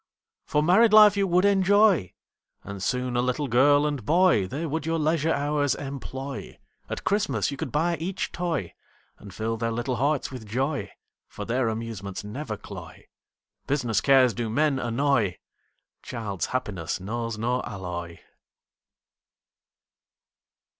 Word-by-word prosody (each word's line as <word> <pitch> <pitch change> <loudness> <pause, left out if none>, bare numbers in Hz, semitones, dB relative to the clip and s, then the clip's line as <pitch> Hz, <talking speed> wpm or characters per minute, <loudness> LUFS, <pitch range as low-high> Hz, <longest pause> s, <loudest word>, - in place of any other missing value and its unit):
For 150 0 +1
married 210 +7 +5
life 210 -1 +8
you 200 -1 +1
would 180 +2 +3
enjoy, 200 - +4 0.5
And 100 -1 -7
soon 125 +4 -1
a 120 - +2
little 125 +3 -1
girl 145 +4 +4
and 145 -5 -2
boy, 165 - +3
They 145 - -4
would 160 0 -2
your 165 +1 -1
leisure 160 0 +1
hours 145 -2 +1
employ, 135 -1 -7 0.3
At - - -5
Christmas 145 - 0
you 140 - -6
could - - -4
buy 165 +3 +1
each 185 +4 -3
toy, 165 - -3 0.5
And 100 - -11
fill 110 +3 -3
their 115 +1 -1
little 120 +2 -2
hearts 140 +3 0
with 125 -5 -8
joy, 135 +6 -2 0.4
For - - -7
their 120 0 0
amusements 110 -4 -5
never 120 +9 -5
cloy, - - -11 0.6
Business 125 -7 0
cares 130 -3 +5
do 115 +2 -3
men 145 +3 +1
annoy, 120 -5 +1 0.6
Child's 100 -6 -4
happiness 105 -12 -3
knows 115 +3 -4
no 125 +3 0
alloy. 85 -3 -6
130 Hz, 140 wpm, -26 LUFS, 115-155 Hz, 0.6 s, life